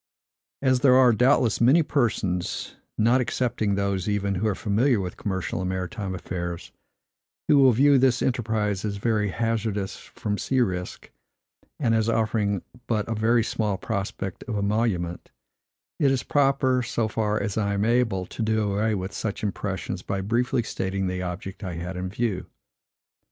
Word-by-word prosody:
As 130 -2 +3
there 130 -1 +5
are, 130 -2 +6
doubtless, 125 0 +3
many 140 +8 +6
persons, 110 - -1 0.2
not 120 +4 +4
excepting 115 -4 0
those, 100 -1 -1
even, 100 -1 0
who 95 +4 0
are 105 - 0
familiar 110 +5 +2
with 90 -2 -4
commercial 95 -3 -3
and 90 - -2
maritime 95 +1 -3
affairs, 85 -1 -5 0.8
who 145 - +5
will 135 -2 +7
view 140 +4 +5
this 125 -2 +3
enterprise 110 -5 0
as 105 -2 -2
very 105 -1 +1
hazardous 110 -2 -1
from 105 -1 -5
sea 130 - 0
risk, 90 -6 -2 0.7
and 120 -5 +2
as 110 0 +2
offering 105 -4 0 0.2
but 110 -3 0
a 115 - -1
very 115 +2 +2
small 105 -3 -1
prospect 95 -2 -4
of 110 -4 -2
emolument, 100 -4 -1 0.7
it 145 - +4
is 135 -1 0
proper, 135 -2 +2
so 115 -1 -1
far 105 -1 0
as 100 -1 -2
I 100 -2 0
am 100 +1 0
able, 115 -6 +1
to 115 - -7
do 110 -2 +1
away 110 +2 +1
with 95 0 -4
such 105 -1 -4
impressions 100 -3 -3
by 100 0 -3
briefly 120 +4 0
stating 95 -2 -2
the 90 0 -2
object 90 +3 -6
I 90 -3 -4
had 90 +2 -5
in 90 +1 -3
view. 105 -2 -2
105 Hz, 160 wpm, -25 LUFS, 95-120 Hz, 0.8 s, will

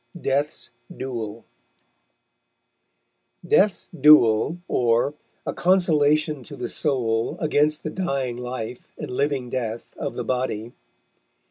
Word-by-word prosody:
DEATH'S 145 0 -1 0.3
DUEL 115 -4 -5 2.0
DEATH'S 190 +2 +2
DVELL; 145 -1 +6
_or, 120 +3 +2 0.3
A - - -2
Consolation 155 -5 +2
to - - -10
the 120 - -4
Soule, 115 -6 0
against 150 -1 +1
the 155 - -3
dying 135 -10 -2
Life, 125 -1 -6
and - - -6
living 140 -1 -1
Death 115 -2 -4
of - - -4
the - - -3
Body. 125 -3 -2
130 Hz, 105 wpm, -23 LUFS, 120-150 Hz, 2.0 s, DVELL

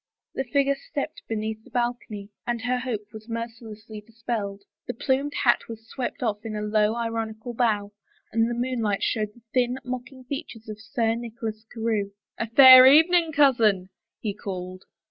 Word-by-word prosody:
The 265 - -2
figure 280 +2 +2
stepped 280 +2 -6
beneath 220 0 -3
the - - -17
balcony, 240 -4 -3 0.2
and 235 -2 -2
her 250 +1 0
hope 225 -4 -5
was 220 +1 -11
mercilessly 225 -2 -7
dispelled. 215 -3 -5 0.2
The - - -4
plumed 275 +4 -1
hat 240 - +3
was 225 0 -9
swept 265 +4 -5
oflF 215 -3 -1
in 220 -2 -5
a 210 - -3
low, 210 +1 +2
ironical 225 0 -4
bow, 215 -4 0 0.4
and 225 +1 +2
the 240 - -2
moonlight 235 -5 -1
showed 215 -1 -1
the 240 - -20
thin, 250 0 +1
mocking 255 +1 -7
features 250 -4 -7
of 215 0 -8
Sir 225 0 0
Nicholas 225 -2 -6
Carewe. 220 -4 -2 0.3
"A 230 - -1
fair 260 +1 +10
evening, 325 +4 +5
cousin," 230 -10 +3 0.3
he 210 -3 -3
called. 185 -2 -7
230 Hz, 165 wpm, -25 LUFS, 215-250 Hz, 0.4 s, fair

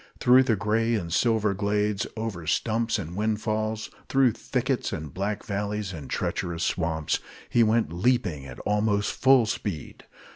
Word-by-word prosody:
Through 125 +1 +6
the 115 -4 +2
gray 110 +3 +1
and 85 -6 -3
silver 110 -2 +2
glades, 105 +1 0
over 105 -8 -4
stumps 115 +7 +1
and 85 +3 -6
windfalls, 110 +1 -1 0.2
through 135 -2 +4
thickets 125 +3 -2
and 75 -2 -5
black 100 +2 -2
valleys 105 -1 -3
and 75 -5 -8
treacherous 85 -2 -2
swamps, 80 -3 0 0.3
he 120 - +4
went 110 -5 +2
leaping 90 - 0
at 60 - -9
almost 105 0 +1
full 130 -3 +5
speed. 100 -7 -5
105 Hz, 145 wpm, -26 LUFS, 90-115 Hz, 0.3 s, Through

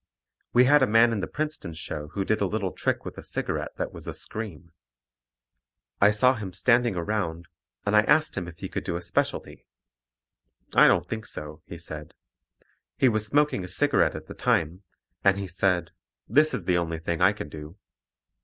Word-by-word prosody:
We 125 +1 +5
had 145 +2 +5
a 130 - +4
man 115 +2 +5
in 110 - -1
the 90 - -3
Princeton 150 - -4
show 75 -2 -6
who 100 -1 -1
did 110 +1 0
a 100 - +2
little 100 -2 -2
trick - - -2
with - - -7
a - - -7
cigarette - - -3
that - - -3
was - - -10
a - - -4
scream. 90 -7 -7 1.3
I 100 - +7
saw 125 +5 +4
him 105 -7 -6
standing 120 0 +2
around, 85 -2 -2 0.4
and 105 +1 +2
I 105 - +7
asked 155 0 +3
him 90 -3 -3
if 85 -2 -10
he - - -5
could - - -4
do 85 - -3
a 85 - -3
specialty. 85 - -2 1.1
"I - - +8
don't - - +3
think 110 0 -5
so," 75 +1 -6
he 85 - -8
said. 80 -2 -9 0.8
He 130 - +4
was 110 -2 +1
smoking 145 -5 +2
a - - -6
cigarette 145 +11 +2
at - - -7
the - - -9
time, 80 +4 0 0.4
and 100 -1 +4
he 100 -1 -4
said 90 0 0 0.4
"This 150 +7 +3
is - - -5
the 90 -1 +2
only 85 -1 -2
thing 85 +1 -3
I 95 +2 +6
can 105 - -7
do." 75 +4 -10
100 Hz, 195 wpm, -26 LUFS, 85-115 Hz, 1.3 s, I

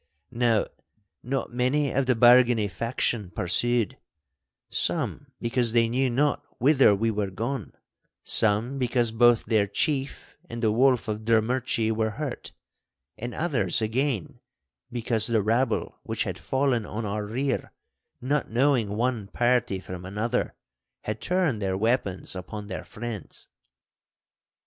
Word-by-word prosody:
Now 115 -3 +2 0.6
not 130 -1 -3
many 130 +3 +1
of 135 0 0
the 130 - +3
Bargany 120 -2 +5
faction 115 -3 -2
pursued; 115 +6 0 0.7
some 145 - 0
because 120 -1 0
they 115 -1 +4
knew 130 +2 +1
not 140 +4 +1
whither 135 -6 +5
we 115 +3 0
were 105 -2 -2
gone, 115 +8 -4 0.5
some 110 +6 +1
because 120 -2 +1
both 120 0 +4
their 110 -2 +2
chief 135 - -2
and 115 +1 -6
the 110 - +3
Wolf 125 +1 +3
of 105 -1 -2
Drummurchie 115 0 +1
were 110 0 0
hurt, 140 +3 -5 0.6
and 120 +2 -6
others 130 - +1
again 115 - -1 0.5
because 115 -2 0
the 115 -3 +2
rabble 115 +5 0
which - - -2
had - - -5
fallen 130 -4 0
on 110 +2 -5
our 105 +1 -2
rear, 130 +5 -2 0.5
not 140 +3 -1
knowing 120 -4 +1
one 120 -3 -1
party 120 -3 +1
from 90 -1 -8
another, 105 +6 -2 0.5
had 110 +1 -5
turned 175 - 0
their 95 -1 -1
weapons 100 -4 0
upon 105 +3 -7
their 95 -2 -6
friends. 115 -2 -7
115 Hz, 130 wpm, -26 LUFS, 110-130 Hz, 0.7 s, Bargany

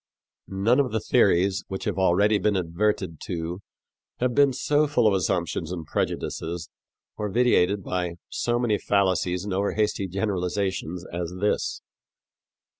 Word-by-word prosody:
None 100 +7 +2
of 135 -3 +1
the 110 - 0
theories 95 0 +2
which 95 -1 -5
have 95 -3 -2
already 100 +3 +3
been 105 +2 +1
adverted 90 -1 -1
to 85 0 -4 0.6
have 125 0 +1
been 140 +1 +5
so 150 +4 +1
full 135 -5 +2
of 105 - +5
assumptions 90 -3 -1
and 85 -3 -5
prejudices 85 +2 -3 0.5
or 105 -1 -2
vitiated 100 -4 +2
by 90 -2 -2
so 120 0 -1
many 120 -4 +1
fallacies 95 -2 +1
and 100 - -3
over 100 +2 0
hasty 105 -2 0
generalizations 95 -2 -2
as 85 0 -4
this. 105 +2 -1
95 Hz, 140 wpm, -25 LUFS, 90-105 Hz, 0.6 s, been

